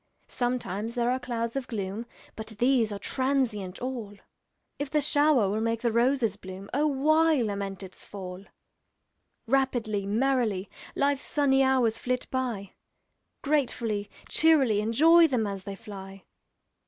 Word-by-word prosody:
Sometimes 235 Hz, -3 st, -2 dB
there 240 Hz, 0 st, +1 dB
are 255 Hz, -, 0 dB
clouds 235 Hz, -1 st, -3 dB
of 270 Hz, -2 st, -3 dB
gloom, 210 Hz, +1 st, -4 dB, 0.3 s
But 220 Hz, 0 st, -7 dB
these 240 Hz, -2 st, +3 dB
are 205 Hz, -, -3 dB
transient 235 Hz, -6 st, -1 dB
all; 235 Hz, -6 st, -5 dB, 0.6 s
If 285 Hz, -1 st, -3 dB
the 300 Hz, -, +2 dB
shower 290 Hz, -5 st, +3 dB
will 210 Hz, +3 st, -1 dB
make 230 Hz, 0 st, -1 dB
the 235 Hz, -, +2 dB
roses 235 Hz, -2 st, +2 dB
bloom, 190 Hz, 0 st, -10 dB
O 295 Hz, +4 st, +2 dB
why 310 Hz, +2 st, +3 dB
lament 200 Hz, -2 st, -4 dB
its 185 Hz, -, -10 dB
fall? 190 Hz, -1 st, -8 dB, 1.0 s
Rapidly, 235 Hz, -6 st, 0 dB
merrily, 225 Hz, -3 st, 0 dB, 0.2 s
Life's 280 Hz, -1 st, +1 dB
sunny 275 Hz, -2 st, +2 dB
hours 255 Hz, -4 st, +2 dB
flit 250 Hz, 0 st, -2 dB
by, 240 Hz, -7 st, -2 dB, 0.7 s
Gratefully, 235 Hz, -8 st, 0 dB, 0.2 s
cheerily 275 Hz, -10 st, +4 dB
Enjoy 325 Hz, +10 st, +6 dB
them 250 Hz, -7 st, 0 dB
as 195 Hz, -2 st, -5 dB
they 200 Hz, -1 st, -5 dB
fly! 195 Hz, -1 st, -10 dB
235 Hz, 135 wpm, -27 LUFS, 205-270 Hz, 1.0 s, Enjoy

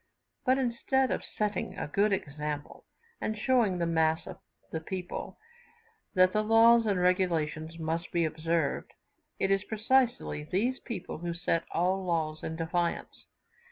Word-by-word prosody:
But, 260 Hz, +1 st, +5 dB
instead 260 Hz, +1 st, +1 dB
of -, -, -1 dB
setting 210 Hz, -1 st, -3 dB
a -, -, -3 dB
good 200 Hz, +7 st, +2 dB
example, 150 Hz, -4 st, -4 dB, 0.4 s
and 215 Hz, -, -2 dB
showing 225 Hz, -5 st, +2 dB
the 170 Hz, -, 0 dB
mass 160 Hz, -1 st, +2 dB
of 190 Hz, -2 st, -9 dB, 0.3 s
the 160 Hz, -, -2 dB
people 180 Hz, +2 st, -5 dB, 0.8 s
that 185 Hz, 0 st, +5 dB
the 215 Hz, -, +3 dB
laws 225 Hz, +1 st, +6 dB
and 200 Hz, -3 st, +1 dB
regulations 165 Hz, -3 st, 0 dB
must 165 Hz, +1 st, -3 dB
be 170 Hz, -1 st, +2 dB
observed, 160 Hz, -1 st, -1 dB, 0.4 s
it 195 Hz, -, +1 dB
is 195 Hz, 0 st, +2 dB
precisely 225 Hz, -, +1 dB
these 225 Hz, -, 0 dB
people 200 Hz, -10 st, -6 dB
who 170 Hz, 0 st, -3 dB
set 170 Hz, -1 st, 0 dB
all 185 Hz, +3 st, +1 dB
laws 160 Hz, -3 st, -1 dB
at 160 Hz, -, -3 dB
defiance. 170 Hz, +1 st, -2 dB
180 Hz, 145 wpm, -30 LUFS, 160-215 Hz, 0.8 s, laws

